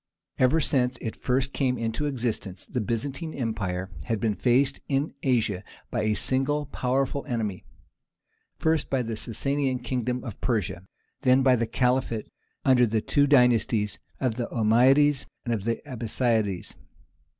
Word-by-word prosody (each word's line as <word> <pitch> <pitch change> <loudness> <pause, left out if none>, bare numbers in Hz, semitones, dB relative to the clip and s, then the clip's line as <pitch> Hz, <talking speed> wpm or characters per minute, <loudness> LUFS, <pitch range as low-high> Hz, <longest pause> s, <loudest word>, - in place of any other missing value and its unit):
Ever 130 +5 +4
since 130 -4 +1
it 115 - -5
first 130 +2 0
came 130 -2 +1
into 115 +6 -2
existence 115 -8 -3
the 125 - -3
Byzantine 135 - -3
Empire 100 -7 -3
had 115 -2 -1
been 110 -1 +1
faced 130 +5 +2
in 140 +2 0
Asia 110 -7 +1 0.3
by 120 - 0
a 105 0 +1
single 135 +6 0
powerful 135 +1 -1
enemy; 110 -7 -3 0.9
first 160 -2 +1
by 130 -2 +1
the 115 -1 -3
Sassanian 135 +4 0
kingdom 125 0 -2
of 115 -6 -8
Persia, 105 -6 -1 0.3
then 130 -1 +4
by 130 -1 +5
the 115 -1 -1
Caliphate 125 -1 0 0.3
under 125 -2 +5
the 110 0 +1
two 145 +5 +2
dynasties 120 -6 +3 0.2
of 125 -4 -1
the 120 - -2
Ommeyades 130 +5 +4 0.2
and 120 - 0
the 115 +3 -1
Abbasides. 115 -5 -1
125 Hz, 140 wpm, -26 LUFS, 110-135 Hz, 0.9 s, by